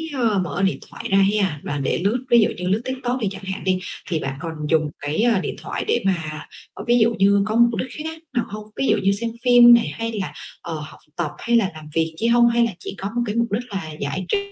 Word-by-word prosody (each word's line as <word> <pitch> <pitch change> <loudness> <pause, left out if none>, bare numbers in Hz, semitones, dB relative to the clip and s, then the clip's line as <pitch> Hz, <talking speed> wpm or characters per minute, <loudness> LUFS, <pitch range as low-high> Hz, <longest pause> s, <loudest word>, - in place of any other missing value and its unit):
ơ, 225 -6 +2
mở 180 +1 -2
điện 190 - +1
thoại - - -7
ra 195 - +5 0.2
ha 190 -8 0
và 145 - -3
để 135 - 0
lướt, 240 +6 0
ví 235 - +7
dụ - - +3
như 180 0 -3
lướt 200 +4 +1
TikTok 255 -1 -2
đi 220 - 0
chẳng 195 0 -8
hạn 190 0 -5
đi, 185 -1 +1 0.3
thì 165 - 0
bạn 135 -2 -4
còn 165 -1 -4 0.2
dùng 155 -2 +2
cái, 145 +8 -1
ơ, 235 -5 +3
điện - - -3
thoại - - -4
để 450 - +1
mà, 160 -5 -2 0.3
ờ, - - -8
ví 240 0 +4
dụ 230 +1 +3
như 200 +1 +4
có 215 +1 -2
mục 235 0 +4
đích 260 - -2
khác 320 +1 -5
nào 240 -3 0
hông? 210 +1 -6
Ví 270 - 0
dụ - - +4
như 195 - +4
xem 225 +4 0
phim 245 -1 +8
này 235 -1 +4
hay 225 +11 -4
là, 200 -4 -4 0.3
ờ, 170 - -6
học 150 - -10 0.2
tập 165 -4 -2
hay 235 - 0
là 205 -5 +1
làm 155 -1 -11
việc 160 0 +1
chi 230 - +1
hông, 235 0 +5
hay 235 0 +3
là 230 - -2
chỉ - - -6
có 195 - -4
một 240 - +1
cái 215 -1 -3
mục 235 0 +2
đích 220 +4 -1
là 190 -5 -4
giải 140 +7 -3
trí - - +2
200 Hz, 275 wpm, -22 LUFS, 175-235 Hz, 0.3 s, phim